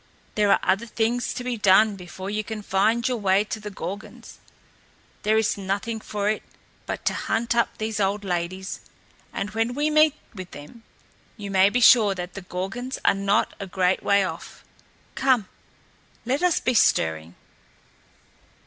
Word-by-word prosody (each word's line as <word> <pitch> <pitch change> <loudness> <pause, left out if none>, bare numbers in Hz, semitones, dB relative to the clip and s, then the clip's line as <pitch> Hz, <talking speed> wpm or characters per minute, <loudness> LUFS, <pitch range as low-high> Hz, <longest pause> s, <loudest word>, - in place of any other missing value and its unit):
"There 210 -1 +2
are - - +5
other 195 +5 +1
things 230 +2 -1
to 250 - -4
be 245 -1 -2
done 210 +1 +5
before 185 +1 -8
you 215 +1 -2
can 215 0 -6
find 220 +5 +1
your 250 -1 0
way 195 -1 +2
to 215 +1 -5
the 210 0 -7
Gorgons. 200 +1 -8 0.8
There 215 +1 +2
is 220 -2 +1
nothing 200 +4 -2
for 205 -1 -3
it 215 0 0 0.5
but - - -5
to - - +2
hunt 230 +1 -1
up 235 - +1
these 215 -1 -3
old 200 +1 0
ladies; 185 +1 -3 0.5
and 205 +1 -4
when 225 +3 -1
we 295 +2 0
meet 305 -1 +5 0.2
with 185 -4 -8
them, 150 +11 -13 0.6
you 200 -2 -6
may 190 0 +5
be 245 +4 0
sure 220 -4 +6
that 180 0 -6
the 195 - -7
Gorgons 195 +8 -5
are - - +5
not 200 +2 +1
a 200 - -5
great 185 0 +1
way 200 0 +3
off. 185 - -7 0.5
Come, 255 -7 +2 0.8
let 265 +6 0
us 360 -2 +3
be 255 - 0
stirring!" 80 - +2
210 Hz, 165 wpm, -24 LUFS, 190-230 Hz, 0.8 s, sure